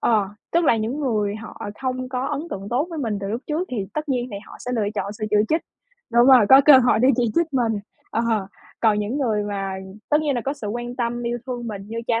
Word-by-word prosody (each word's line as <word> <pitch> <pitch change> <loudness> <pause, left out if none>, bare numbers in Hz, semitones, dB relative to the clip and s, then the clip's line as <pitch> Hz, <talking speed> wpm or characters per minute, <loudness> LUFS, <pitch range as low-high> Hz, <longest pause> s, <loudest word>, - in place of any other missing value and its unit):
ờ, 210 -4 +2 0.2
tức 340 +1 +3
là 235 - +4
những 225 +7 -2
người 210 -7 0
họ 220 0 -10 0.2
không 255 0 -2
có 255 +1 -2
ấn 290 -1 -2
tượng 195 -2 -5
tốt 265 +7 +1
với 325 - -5
mình 225 -7 -1
từ 195 - -4
lúc 230 +4 -2
trước 315 +4 -1
thì 210 -6 -2
tất 305 0 -3
nhiên 250 -2 0
thì 200 - -5
họ - - -11
sẽ 250 - -6
lựa 220 -3 0
chọn 200 -1 -2
sự 215 +1 -5
chỉ 210 - +3
trích 320 - +2 0.5
đúng 240 +1 +6
rồi, 255 -6 +7
có 265 +1 +9
cơ 285 -3 +9
hội 245 -3 +3
để 255 +3 +4
chỉ 245 - +2
trích 340 0 +3
mình 240 -4 +1 0.4
ờ, 225 - 0 0.6
còn 215 -2 +3
những 210 +7 -2
người 220 -7 +1
mà 195 -2 -3 0.4
tất 300 0 +3
nhiên 295 -3 0
là 240 - 0
có 270 +4 -2
sự 260 -7 -7
quan 240 +3 -4
tâm, 240 -1 -2
yêu 240 0 -2
thương 245 -2 -4
mình 205 -3 -6
như 230 +1 -4
cha 230 -1 +1
240 Hz, 260 wpm, -23 LUFS, 215-265 Hz, 0.6 s, có